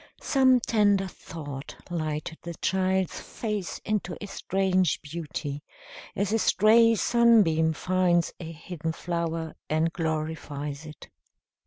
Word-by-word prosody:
Some 260 -3 +4
tender 205 -4 +3
thought 145 -6 -8 0.2
lighted 155 -1 -3
the 170 0 -6
child's 190 +1 0
face 210 -5 -4
into 205 -4 -2
a - - -6
strange 185 -4 +1
beauty, 150 -2 -5 0.5
as 200 +2 0
a 225 - +3
stray 225 +3 +5
sunbeam 205 -9 +4
finds 180 0 +1
a 165 -2 -6
hidden 160 0 -5
flower 165 -1 -3 0.2
and 160 +2 +1
glorifies 155 -2 -3
it. 150 - -11
175 Hz, 115 wpm, -27 LUFS, 160-200 Hz, 0.5 s, stray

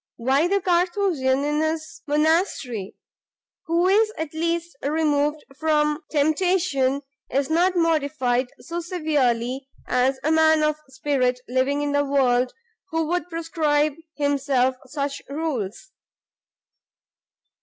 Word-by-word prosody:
why 270 +7 +2
the 395 +2 +2
Carthusian 345 -7 +1
in 295 +1 0
his 315 +1 -3
monastery, 295 - 0 0.7
who 335 +2 +2
is 430 +3 +4
at 320 -1 -4
least 335 +1 -2
removed 300 0 +1 0.2
from 300 -1 +2
temptation, 295 -3 +1 0.3
is 275 +3 0
not 355 +3 +3
mortified 285 -7 +1
so 340 0 -5
severely 275 -7 -1 0.2
as 255 +2 +1
a 310 - +1
man 315 -1 +4
of 305 0 +2
spirit 260 -2 0
living 265 +3 +1
in 290 - -1
the 285 0 +2
world, 255 -3 +2 0.4
who 325 -1 0
would 355 +2 -2
prescribe 310 -3 0 0.2
himself 275 -3 +1
such 280 0 -3
rules." 285 - -4
300 Hz, 110 wpm, -23 LUFS, 270-325 Hz, 0.7 s, is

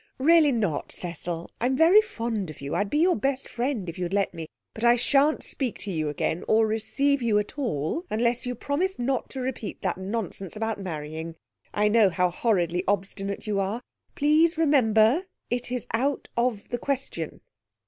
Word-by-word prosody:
'Really 310 +1 +5
not, 205 - -1
Cecil. 170 -1 -5
I'm 260 +2 +1
very 345 +7 +7
fond 230 - -3
of 155 - -10
you. 140 +1 -5
I'd 205 0 0
be 295 - 0
your 350 +4 +4
best 270 +4 -1
friend 240 -5 -2
if 170 +1 -6
you'd 180 +2 -2
let 200 -2 +1
me, 165 -2 -6 0.3
but 220 - -7
I 240 0 +6
shan't 280 +5 +3
speak 255 -5 -1
to 200 - -2
you 155 -3 -1
again 160 +3 -2
or 220 +1 +4
receive 270 +6 +1
you 225 -3 +2
at 210 0 -2
all 240 - -2
unless 235 +2 +1
you 250 0 -3
promise 340 +10 -1
not 255 +2 -1
to 265 - -5
repeat 250 -4 -5
that 185 -1 -1
nonsense 195 -1 -4
about 220 -1 -2
marrying. 160 -2 -5 0.4
I 210 0 +2
know 210 -2 +5
how 180 0 +1
horridly 180 -4 +1
obstinate 195 0 -2
you 210 -2 0
are! 205 +5 -2 0.3
Please 310 +3 +3
remember 270 - +4 0.2
it's 245 0 -2
out 270 +5 0
of 235 -4 -1
the 240 - -2
question.' 260 - -3
225 Hz, 180 wpm, -26 LUFS, 190-270 Hz, 0.4 s, very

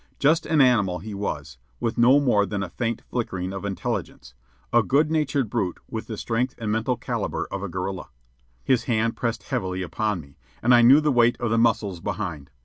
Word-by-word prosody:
Just 160 +4 +2
an 155 -2 +3
animal 105 -9 +3
he 105 +5 -8
was, 75 -9 -5 0.2
with 115 - -1
no 125 +4 +6
more 105 -8 +2
than 100 -1 -2
a 95 - -5
faint 115 +4 -3
flickering 95 -6 -3
of 95 - -6
intelligence, 95 -10 -4 0.4
a 120 - +6
good 150 +6 +2
natured 145 -5 +1
brute 100 -5 -2
with - - -6
the - - -5
strength 125 +3 -1
and 110 -3 -3
mental 115 +3 0
caliber - - -3
of 100 - -4
a 100 - -4
gorilla. 95 +1 -4 0.5
His 130 -3 +2
hand 115 -1 0
pressed 115 -1 -2
heavily 95 -8 -2
upon 100 +4 -2
me, 70 -2 -15 0.2
and 120 +2 +5
I 120 - +7
knew 130 +6 +7
the 150 -1 +2
weight 120 -1 +3
of 120 -2 -1
the 115 - +3
muscles 105 -5 +1
behind. 90 -7 -4
110 Hz, 200 wpm, -24 LUFS, 95-125 Hz, 0.5 s, I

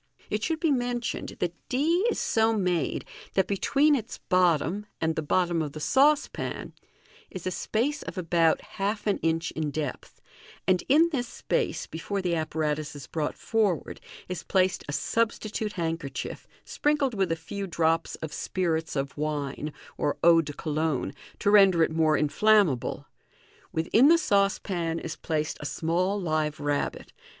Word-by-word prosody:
It 210 +1 -1
should 320 -1 0
be 325 -3 +2
mentioned 245 -2 -2
that 175 -1 -1 0.2
d 330 - +2
is - - -1
so 225 0 +2
made, 180 -6 0 0.3
that 190 - +4
between 280 +9 +2
its 235 -2 -4
bottom 180 +2 +2
and 160 0 0
the - - -1
bottom 175 +2 +1
of 150 -2 -4
the 155 - -6
saucepan 285 - +1 0.6
is 185 - -8
a 185 - 0
space 255 - -1
of 185 - -7
about 165 -2 +2
half 205 +2 -3
an 205 - +1
inch 165 0 0
in 155 -1 -2
depth, 145 -2 -5 0.5
and 185 -2 +3
in 320 +5 +6
this 250 -5 -1
space, - - -2
before 195 +5 -4
the 180 -2 -1
apparatus 155 -2 -2
is 140 -3 -8
brought 150 +2 -3
forward, 210 -7 0 0.3
is 180 -1 -4
placed 185 -1 +1
a - - -1
substitute 215 +3 -1
handkerchief, 165 -6 -4 0.2
sprinkled 290 -5 0
wzth 190 -3 +1
a - - +2
few 195 +5 -6
drops 165 -1 +1
of 155 - -9
spirits 165 -4 -1
of 135 0 -2
wine 150 0 -3 0.3
or 145 - 0
eau 165 -1 +7
de 150 - -6
Cologne, 155 -1 -1 0.2
to 205 - +1
render 195 -5 +6
it 160 - +1
more 160 -1 +3
inflammable 180 - +2
j - - -33
within 215 - +4
the 335 +2 +7
saucepan 195 - +1
is - - -5
placed 155 -2 -2
a - - -7
small 180 +7 0
live 155 -4 -1
rabbit. 145 -1 -2
175 Hz, 160 wpm, -27 LUFS, 155-215 Hz, 0.6 s, eau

